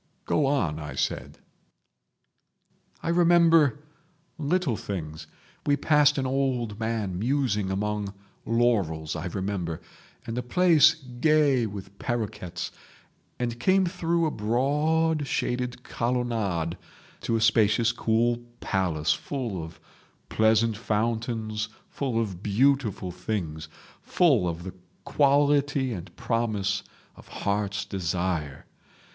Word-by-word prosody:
"Go 145 -3 +2
on," 90 - 0
I 75 -3 -6
said. - - -2 1.7
"I - - -2
remember 165 -4 +4 0.6
little 155 -3 +1
things. 80 -7 -6 0.4
We 145 0 +3
passed 145 0 +4
an 135 - 0
old 130 -5 -1
man 110 -5 -2
musing 115 -5 0
among 105 +1 -2 0.3
laurels, 100 -11 +1
I 85 +2 -4
remember, 90 -3 -3 0.5
and 115 +2 -3
a - - -1
place 155 +3 +5
gay 135 -2 +2
with 100 -1 -9
paroquets, 105 -8 -3 0.7
and 120 -1 -3
came 190 +8 +3
through 170 -2 0
a 155 - 0
broad 145 +7 +1
shaded 125 -1 -2
colonnade 115 -9 -1 0.4
to 115 - -1
a - - +2
spacious 110 +1 +3
cool 120 0 +1 0.2
palace, 90 -6 0
full 120 - -4
of 80 +1 -10 0.5
pleasant 110 0 +3
fountains, 110 0 -2 0.2
full 130 -5 -1
of 100 -6 -3
beautiful 110 -3 +1
things, 85 -5 -4 0.3
full 135 - +3
of 85 0 -5
the 95 - -7 0.3
quality 140 -2 +2
and 90 -2 -8
promise 105 -4 -1 0.3
of - - -16
heart's 100 0 -2
desire. 85 -6 -2
115 Hz, 110 wpm, -26 LUFS, 95-140 Hz, 1.7 s, place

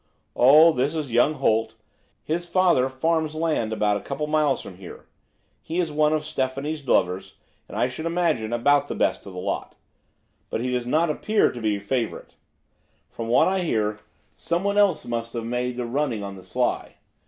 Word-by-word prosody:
"Oh, 150 +6 +7
this 140 +2 -1
is 150 -5 -3
young 120 +6 +3
Holt; 115 -5 +1 0.5
his 175 +2 -3
father 170 -8 +3
farms 155 +3 -1
land 155 -9 0
about 105 -1 +1
a - - -7
couple 140 +2 -5
of 150 - -3
miles 150 -3 +2
from 90 - -10
here. 90 -2 -11 0.6
He 165 +3 -3
is 170 -3 0
one 150 0 +2
of 155 -1 0
Stephanie's 140 +1 -3
lovers, 90 -2 +1 0.3
and - - -8
I 125 - +2
should 160 +6 -5
imagine 165 -10 0
about 145 +4 +3
the - - -4
best - - 0
of 95 - -9
the 90 - -6
lot. 100 +2 -4 0.7
But - - -2
he 125 +1 -2
does 125 -1 -2
not 155 +5 +2
appear 215 +7 +1
to 120 - -8
be 105 -2 0
first 100 0 -14
favourite; 125 -4 -2 0.8
from 115 - -6
what 120 - +4
I 190 +1 +1
hear 110 - -1 0.4
someone 200 +4 0
else 200 -5 +3
must 115 -1 -4
have 115 -2 -4
made 125 +1 -2
the 125 - -2
running 120 -3 -1
on 100 0 -6
the 95 - -11
sly. - - -2
135 Hz, 190 wpm, -24 LUFS, 115-155 Hz, 0.8 s, Oh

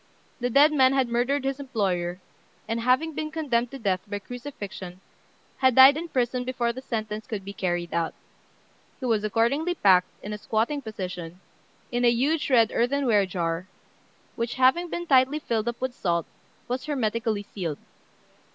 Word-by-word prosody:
The 245 0 -1
dead 290 +5 +5
man 260 -2 +5
had 265 -3 +1
murdered 250 +4 0
his 270 +1 -2
employer, 190 -9 -2 0.5
and, 225 +1 -1
having 255 +7 +2
been 310 +1 -3
condemned 265 -7 0
to 275 - -8
death 195 -7 0
by 205 0 -3
crucifixion, 205 -6 -8 0.6
had 260 -2 +3
died 265 +2 +9
in 335 +3 -4
prison 250 -3 -1
before 245 -2 -1
the 260 - -7
sentence 215 -4 -4
could 200 -4 -5
be 200 - -6
carried 175 -3 -2
out. 165 -1 -1 0.8
He 260 - -5
was 220 -4 +1
accordingly 245 - +1
packed, 185 - +4
in 210 - -5
a 210 - -6
squatting 230 +8 -1
position, 180 -6 -6 0.5
in 245 0 0
a 240 - +6
huge 285 +7 +1
red 230 -4 +4
earthenware 240 -5 +2
jar, 170 0 -2 0.7
which, 230 0 -3
having 265 +7 +3
been 345 +1 -4
tightly 270 -1 +4
filled 230 -7 -2
up 235 0 -3
with. 260 -1 -2
salt, 170 -7 -1 0.4
was 255 +1 -3
hermetically 225 -6 -1
sealed. 170 -7 -5
235 Hz, 165 wpm, -26 LUFS, 205-265 Hz, 0.8 s, died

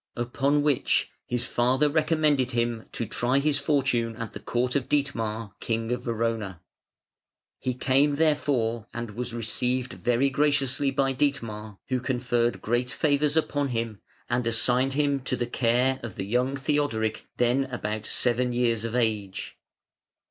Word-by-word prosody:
Upon 135 +4 +1
which 145 -4 +2 0.2
his 120 0 -1
father 130 +5 +2
recommended 155 -3 +2
him 120 -1 -1
to 115 - -3
try 120 +4 0
his 145 0 +2
fortune 130 -6 +1
at 115 -1 -6
the - - -6
court 125 +2 -1
of 135 -3 0
Dietmar, 115 -7 -1
King 115 0 -2
of 125 0 -1
Verona. 115 -6 -2 1.0
He 125 -1 -2
came 140 +3 +3
therefore 140 -8 +1
and 120 -2 -4
was 120 +3 -4
received 125 +2 -1
very 125 +3 +1
graciously 140 -1 +2
by 135 0 +1
Dietmar, 115 -7 -2
who 130 -1 +1
conferred 120 -5 0
great 120 +2 0
favours 150 +1 +1
upon 145 -2 +1
him 115 -4 -3 0.3
and 120 0 0
assigned 125 +3 +2
to - - -4
him 140 -2 +2
the 125 -2 -1
care 125 +2 +1
of 115 -5 -7
the 95 - -4
young 125 +6 +1
Theodoric 135 -6 -1
then 125 +3 +2
about 110 -4 -4
seven 125 0 +1
years 120 -2 +1
of 115 +1 -3
age. 105 -5 -1
125 Hz, 150 wpm, -26 LUFS, 115-140 Hz, 1.0 s, came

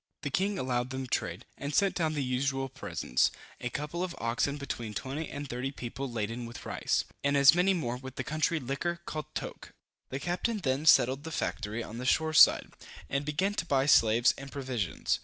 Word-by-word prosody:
The 145 - -2
king 195 +6 +1
allowed 125 -3 -1
them 130 0 -4
trade, 125 - -2
and 140 +1 -3
sent 200 -1 +4
down 160 -3 0
the 145 - 0
usual 135 +1 -1
presents, 65 - 0 0.3
a 120 - -3
couple 150 +7 -3
of 185 - -4
oxen 120 +5 0
between 120 -6 -5
twenty 140 +7 -4
and 145 0 -5
thirty 125 +2 -3
people 135 0 -5
laden 115 +1 -3
with 115 - -9
rice, - - 0 0.2
and 140 0 +3
as 140 +1 +8
many 180 +3 +3
more 125 -8 -2
with 130 0 -9
the 130 - -3
country 155 +4 0
liquor, 155 +6 -3
called 155 -2 -4
toke. - - -6 0.4
The 135 - -3
captain 180 +9 -1
then 145 -4 -1
settled 135 -1 +5
the 160 - -5
factory 110 -5 -2
on 115 +2 -7
the 125 - -5
shore 160 +4 +2
side, - - +6 0.4
and 140 +1 0
began 185 +7 0
to 205 - -2
buy 135 -2 +2
slaves 115 -4 +5
and 135 0 -9
provisions. 125 - -2
135 Hz, 195 wpm, -30 LUFS, 125-155 Hz, 0.4 s, as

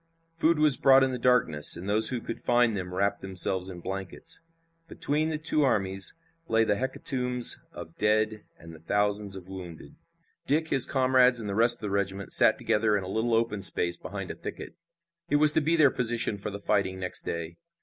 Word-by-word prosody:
Food 165 0 0
was 150 -4 +6
brought 135 0 +4
in 135 - 0
the 125 - -5
darkness, 115 -13 +2
and 90 +3 -9
those 105 +2 +5
who 125 -2 -3
could 115 - -7
find 120 -2 +1
them 90 -2 -6
wrapped 100 +2 -2
themselves 95 0 +2
in 90 -2 -10
blankets. 95 - -5 0.5
Between 155 0 0
the 155 - -3
two 155 0 +1
armies 95 -7 +1 0.3
lay 115 0 +1
the 105 -2 0
hecatombs 125 0 +2
of 85 -1 -11
dead 110 0 -1
and 85 0 -14
the 80 - -14
thousands 100 +3 -2
of 95 -2 -9
wounded. 90 -4 -11 0.5
Dick, 160 +3 0
his 135 -2 +3
comrades 130 -2 +2
and 110 - -7
the 100 - -4
rest 115 +3 +3
of - - -21
the 105 -2 -5
regiment 100 -1 -3
sat - - +5
together 105 -1 0
in 100 - -5
a - - -8
little 110 +4 -2
open 115 -3 -2
space 85 -2 +1
behind - - -8
a - - -9
thicket. - - -9 0.5
It 145 - 0
was 150 0 +6
to 160 - +1
be 160 +3 +1
their 150 -5 +3
position 115 -4 -1
for 100 - -4
the 100 0 -8
fighting 100 -2 -2
next 90 -1 -2
day. 85 0 -7
105 Hz, 200 wpm, -26 LUFS, 95-125 Hz, 0.5 s, was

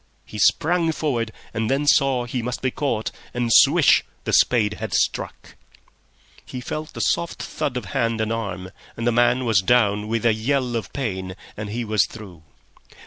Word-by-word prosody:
He 105 - -8
sprang 165 - +3
forward, 125 -8 -2 0.2
and 110 0 -1
then 140 +2 +1
saw 135 -3 +3
he 120 +1 -3
must 125 +2 -4
be 130 - +1
caught, 120 -7 -2 0.2
and 120 -2 +1
swish! - - +6 0.2
the - - -3
spade 105 -4 +3
had - - -3
struck. - - -2 0.9
He 125 - -7
felt 155 +5 -6
the - - -4
soft 170 - -1
thud 125 -3 -3
of 120 - -5
hand 115 -4 0
and 110 +1 -1
arm, 95 -5 -5 0.3
and 115 - -3
the 120 - +3
man 120 +2 +2
was 110 -5 +3
down 105 -1 +2
with 115 +1 -2
a 115 - +5
yell 125 +2 -1
of 115 - -4
pain, 95 -8 -4 0.2
and 105 0 -6
he 115 +3 -3
was 110 -1 +2
through. 100 -7 -11
115 Hz, 180 wpm, -22 LUFS, 110-130 Hz, 0.9 s, swish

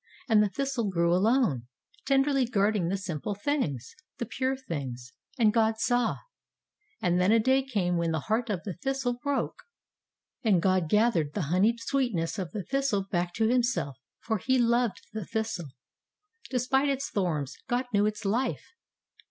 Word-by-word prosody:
And 220 -3 +5
the 210 - +2
thistle 260 -2 -1
grew 170 -2 +2
alone, 185 - +2 0.4
ten 270 -1 +4
derly 275 -4 +1
guarding 205 -4 +2
the 195 +3 0
simple 190 +1 -4
things, 195 - -2 0.2
the 235 - -3
pure 260 +4 -1
things. 130 - -6 0.2
And 220 -4 +4
God 220 -1 +2
saw. 245 -1 +1 0.9
And 180 +1 +2
then 185 +3 +4
a 225 - +6
day 260 +4 +3
came 200 -10 -1
when 170 0 0
the 160 -2 -1
heart 225 - -1
of 185 -5 -2
the 195 - -4
thistle 245 +5 -2
broke. 285 -1 -2 0.8
And 205 -6 +4
God 185 -2 +2
gathered 210 -9 +2
the 200 - 0
honeyed 215 +6 +3
sweetness 230 -9 -1
of 180 -3 -3
the 210 -3 -4
thistle 270 -5 0
back 175 -2 0
to 220 0 +2
Himself, 235 - +1 0.2
for 220 -2 -2
He 260 +6 +2
loved 235 -3 +2
the 215 -1 -3
thistle. 220 -8 -3 0.8
De 260 - -1
spite 265 +3 +2
its 275 0 -2
thorns, 155 -8 -1
God 250 0 0
knew 205 0 +4
its 215 0 -4
life. 235 +7 -1
215 Hz, 170 wpm, -28 LUFS, 180-250 Hz, 0.9 s, a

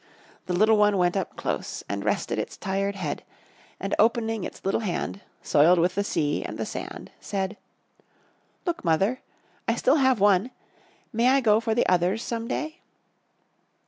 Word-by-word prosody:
The 180 - -1
little 215 +3 +5
one 210 -1 +4
went 175 0 +2
up 195 - -2
close - - -3
and - - -3
rested - - -1
its - - -5
tired 195 +1 -1
head; 160 -7 -3 0.6
and 195 - -3
opening 225 -1 +2
its - - -8
little 195 - +1
hand, 200 -1 -3 0.2
soiled 165 +5 +5
with 175 +2 +2
the 200 - 0
sea 150 -7 -1
and - - -6
the - - -2
sand, - - -7
said: 195 0 -3 1.1
"Look, 345 -2 -2
mother, 195 +9 +1 0.5
I 230 - +2
still 265 +5 +3
have 260 -4 +3
one. 200 +3 +4 0.6
May 230 +2 +3
I 270 +1 +5
go 215 -4 +4
for 225 -1 -1
the 240 - +3
others 180 +5 +2
some 230 -1 -3
day?" 310 +6 -3
205 Hz, 165 wpm, -26 LUFS, 185-230 Hz, 1.1 s, little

